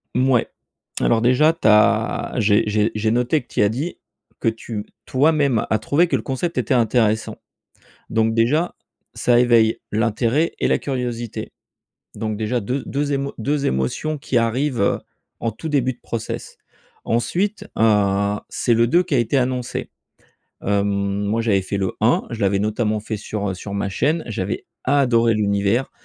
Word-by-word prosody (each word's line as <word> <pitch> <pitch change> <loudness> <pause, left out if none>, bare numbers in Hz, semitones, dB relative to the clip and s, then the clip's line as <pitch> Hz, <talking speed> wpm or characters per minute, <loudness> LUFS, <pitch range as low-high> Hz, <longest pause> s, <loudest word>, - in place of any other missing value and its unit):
Mouais. 130 -2 +3 0.5
Alors 115 -1 +3
déjà 130 +7 +4
tu 165 - 0
as 105 0 +3
j'ai 105 0 +3
j'ai 105 +1 +1
j'ai 110 0 0
noté 125 +5 +1
que - - -33
tu - - 0
y - - +5
as 100 - +4
dit 140 +11 -4 0.4
que - - +1
tu 110 -1 -4 0.2
toi-même 140 -4 +2
a 110 - +2
trouvé 145 - +2
que - - +1
le - - -4
concept 140 +5 -3
était 125 -1 0
intéressant. 110 -2 +1 0.7
Donc 110 0 +1
déjà, 140 +10 +1 0.4
ça 120 -1 +3
éveille, 115 -2 +4
l'intérêt 115 +8 +1
et - - +1
la - - +3
curiosité. 120 -4 -4 0.6
Donc 110 0 -3
déjà 110 +3 -1
deu 130 +7 -2
deux 145 +1 -1
émo 140 0 -2
2 140 +5 -1
émotions 65 - -1
qui 135 -2 -1
arrivent 120 +1 0
heu, - - +2 0.4
en 115 - -1
tout 160 +9 -7
début 130 -4 +1
de - - -26
process. 115 -2 -5 0.5
Ensuite 185 - -1
heu, 100 -2 +3
c'est 120 - +1
le 115 +1 +3
2 175 +7 +3
qui 160 - -4
a - - +3
été 120 +4 +1
annoncé. 125 -1 -2 0.7
Hem, 100 0 +1 0.4
moi 110 +3 0
j'avais 100 -4 +2
fait 100 +2 -3
le 95 -1 -1
1, 115 +3 +3
je 115 - -5
l'avais 100 0 +2
notamment 105 +1 0
fait 110 0 -4
sur 100 -1 -4
heu, - - -2
sur 100 +2 -7
ma 100 0 -1
chaîne. 155 - 0
J'avais 100 -2 -3 0.2
adoré 120 -4 +3
l'univers, 100 +4 +1
115 Hz, 170 wpm, -21 LUFS, 105-135 Hz, 0.7 s, y